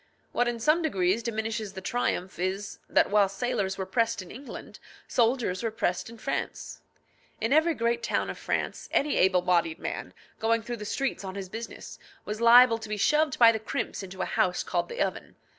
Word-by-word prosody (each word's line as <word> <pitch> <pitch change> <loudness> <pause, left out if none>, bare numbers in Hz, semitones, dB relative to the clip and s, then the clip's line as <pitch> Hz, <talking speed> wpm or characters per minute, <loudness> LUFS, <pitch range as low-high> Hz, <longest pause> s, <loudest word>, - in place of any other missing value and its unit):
What 245 - +1
in 240 -1 -2
some 305 +8 +3
degree 190 - +2
diminishes 220 -2 -3
the 190 - -6
triumph 190 -3 -2
is, 190 +3 -3
that - - +3
while 205 -2 +4
sailors 200 -2 -2
were 190 - -3
pressed 230 +3 0
in 175 - -13
England, 270 +3 -9 0.3
soldiers 230 -6 +1
were 230 - 0
pressed 215 -3 -2
in 230 - -11
France. 275 - -4 0.6
In 225 +5 +1
every 320 +2 +4
great 235 0 0
town - - 0
of - - -6
France, - - -3
any 290 +1 +1
able 185 -1 +4
bodied 170 -3 +2
man, - - -5 0.2
going 225 0 +1
through 240 +1 -5
the 210 - -7
streets 270 +1 -2
on 190 0 -6
his 195 -2 -6
business, 225 +3 -8 0.3
was 210 +2 -4
liable 235 0 +7
to 220 -1 -8
be 210 - -2
shoved 300 +6 +2
by 230 -1 +8
the 220 - -2
crimps 220 - -3
into 190 -1 -5
a - - -1
house 180 -1 +1
called - - -1
the 480 +1 -6
oven. - - -5
225 Hz, 195 wpm, -28 LUFS, 190-240 Hz, 0.6 s, by